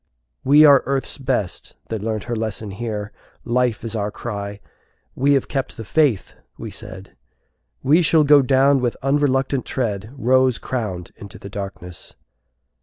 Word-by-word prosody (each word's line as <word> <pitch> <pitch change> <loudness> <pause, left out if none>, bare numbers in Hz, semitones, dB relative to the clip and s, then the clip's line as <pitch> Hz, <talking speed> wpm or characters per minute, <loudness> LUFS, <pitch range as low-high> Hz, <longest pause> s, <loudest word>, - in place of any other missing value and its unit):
"We 145 +3 +7
are 140 -3 +7
Earth's 135 +1 -2
best, 125 -8 -2
that 110 -2 -3
learnt 110 -1 -2
her 120 - -3
lesson 110 -2 -4
here. 105 0 -5 0.3
Life 125 -2 0
is 115 -2 -4
our 105 -1 -1
cry. 100 -2 -6 0.5
We 140 +2 +2
have 135 - +1
kept 135 -3 -3
the 115 - -7
faith!" 140 -3 +1 0.2
we - - -7
said; 95 +1 -10 0.7
"We 155 +6 +4
shall 160 -1 +4
go 145 -1 +6
down 135 +1 +3
with 120 -2 -1
unreluctant 135 -1 +1
tread 110 -4 -3
Rose 130 0 +3
crowned 105 -9 -4
into 100 - -11
the 100 - -10
darkness!" 95 -3 -8
120 Hz, 150 wpm, -21 LUFS, 105-135 Hz, 0.7 s, We